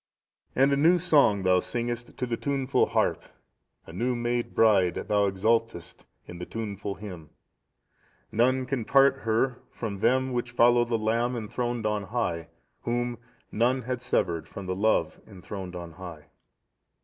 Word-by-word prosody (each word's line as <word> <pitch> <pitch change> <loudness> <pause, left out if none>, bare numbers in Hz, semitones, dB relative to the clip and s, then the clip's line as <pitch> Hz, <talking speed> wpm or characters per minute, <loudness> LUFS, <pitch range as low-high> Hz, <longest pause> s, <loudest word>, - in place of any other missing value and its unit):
"And 135 +2 +4
a - - +2
new 165 +5 +5
song 145 - +3
thou 90 0 +4
singest 120 +2 -4
to 125 - -1
the 120 -1 -2
tuneful 140 +1 0
harp; - - +1 0.6
a 80 - -12
new 120 +7 -1
made 120 0 -2
bride, 100 -6 +4
thou 105 -1 +1
exultest 110 -2 -1 0.2
in 85 - -10
the 90 - -5
tuneful 100 -3 -5
hymn. 90 -7 -9 1.0
"None 130 +3 +2
can 125 -3 -2
part 135 +3 +4
her 120 +2 0
from 105 -4 -5
them 130 +4 +2
which 120 0 -3
follow 120 0 +5
the 120 -1 0
Lamb 115 +3 0
enthroned 120 +1 -3
on 105 -1 -1
high, 90 -8 -2 0.3
whom 120 0 -2 0.3
none 125 +4 +1
had 125 0 -3
severed 85 -9 -1
from 100 - -8
the 90 0 -2
Love 110 +3 +1
enthroned 95 -2 -8
on 85 -1 -7
high." 85 -3 -10
115 Hz, 150 wpm, -27 LUFS, 100-125 Hz, 1.0 s, new